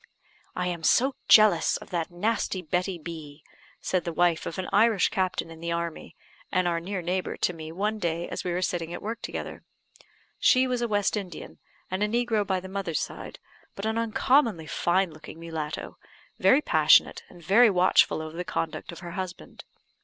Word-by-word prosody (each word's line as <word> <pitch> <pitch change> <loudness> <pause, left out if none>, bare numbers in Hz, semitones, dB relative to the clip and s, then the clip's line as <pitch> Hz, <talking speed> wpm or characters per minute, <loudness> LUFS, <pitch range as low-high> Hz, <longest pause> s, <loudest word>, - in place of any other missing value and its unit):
"I 180 - -1
am 175 -2 -3
so 260 - +3
jealous 215 -1 +6
of - - -14
that 170 -2 -2
nasty 185 0 -1
Betty 180 +3 -1
B 155 -3 -9 0.2
," - - -25 0.2
said 185 -2 0
the 170 - -3
wife 170 0 +1
of 165 - -5
an 185 - -3
Irish 215 -1 +4
captain 185 -4 -2
in 165 - -11
the 170 +1 -4
army, 170 -1 -4 0.4
and 185 -2 +1
our 170 -1 0
near 185 +1 -4
neighbour, 180 +2 -2
to 180 - 0
me, 160 -1 -8
one 210 +5 -2
day 170 -2 -2
as - - -5
we 180 - -2
were 180 +2 -1
sitting 170 -2 -2
at - - -8
work 225 +2 -4
together. - - -6 0.8
She 255 0 +5
was 250 -1 -1
a 240 - 0
West 205 -2 +1
Indian, 185 -6 -7 0.3
and 190 +2 -2
a 210 - +3
negro 225 -2 0
by 190 -1 0
the 185 - -9
mother's 190 -5 -2
side, - - -6 0.4
but 195 - -5
an 220 +1 0
uncommonly 230 - +2
fine 175 +3 +1
looking 155 +1 -12
mulatto, 160 -2 -6 0.4
very 280 +3 +5
passionate, - - +4
and 175 -2 -15
very 225 +7 +6
watchful 180 -4 +3
over 155 0 -8
the 180 - -3
conduct 165 -1 -4
of 170 - -10
her 175 -2 -7
husband. 185 -1 -7
180 Hz, 190 wpm, -27 LUFS, 170-210 Hz, 0.8 s, jealous